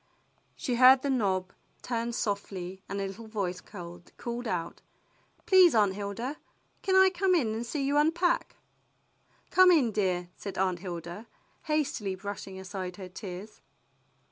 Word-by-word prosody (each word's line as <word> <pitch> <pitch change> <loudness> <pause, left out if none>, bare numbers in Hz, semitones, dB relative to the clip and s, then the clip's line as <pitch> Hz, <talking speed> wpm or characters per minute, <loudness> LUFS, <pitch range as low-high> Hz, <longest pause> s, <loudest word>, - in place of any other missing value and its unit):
She 250 -8 -2
heard 255 +1 +8
the 280 - +1
knob 195 -6 0 0.3
turn 235 -1 -2
softly 195 -4 -3
and 200 0 -3
a 195 - -1
little 215 +4 -8
voice 190 -4 -3
called 175 -3 -11 0.4
out, 175 -4 -3 0.6
"Please, 370 -6 +6
Aunt 205 -3 +4
Hilda, 210 +8 -4 0.4
can 380 - +1
I 380 0 +7
come 370 0 +2
in 235 -10 +1
and 225 +2 -3
see 275 +4 -3
you 280 +2 +1
unpack? 345 +10 +2 0.5
" - - -38
"Come 370 0 +7
in, 290 -10 +4
dear," 185 -4 0
said 200 - -7
Aunt 185 -2 +1
Hilda, 175 +3 -7 0.4
hastily 285 -11 -1
brush 200 +2 -6
ing 190 -1 -8
aside 185 -1 -6
her 185 -1 -9
tears. 190 +2 -8
210 Hz, 150 wpm, -29 LUFS, 185-270 Hz, 0.6 s, heard